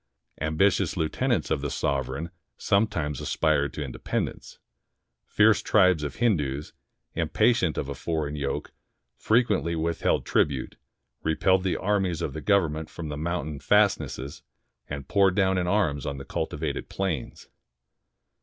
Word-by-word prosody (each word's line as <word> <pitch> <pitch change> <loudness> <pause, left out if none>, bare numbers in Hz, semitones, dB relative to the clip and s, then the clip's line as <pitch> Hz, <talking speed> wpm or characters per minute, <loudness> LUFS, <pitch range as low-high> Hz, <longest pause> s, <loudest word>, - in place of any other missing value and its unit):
Ambitious 90 +4 +2
lieu 80 -2 +1
tenants 125 +6 -1
of 75 -3 +1
the 75 - -2
sovereign 70 +6 -2 0.3
sometimes 85 - 0
aspired 75 -3 +1
to 75 -2 -5
independ 65 - -2
ence. - - -14 0.7
Fierce 105 0 +4
tribes 95 -6 +4
of 75 - -4
Hindoos, 75 - 0 0.4
impatient 115 -10 +2
of 70 - -2
a 70 - -3
foreign 75 +2 -3
yoke, 70 -2 -3 0.4
frequently 110 -7 +1
withheld 80 +1 0
tribute, 70 -4 0 0.5
repelled 95 +4 +2
the 95 - 0
armies 95 -4 0
of 70 - -3
the 80 - -5
Government 80 -6 +1
from 80 -3 -7
the 75 - -4
mountain 75 -2 -3
fastnesses, 100 -9 +1 0.5
and 70 -2 -6
poured 95 -1 +3
down 95 -2 +2
in 90 - -1
arms 85 -8 +1
on 70 -1 -3
the 70 - -8
cultivated 75 +1 -3
plains. 90 -9 -3
80 Hz, 135 wpm, -26 LUFS, 75-95 Hz, 0.7 s, Fierce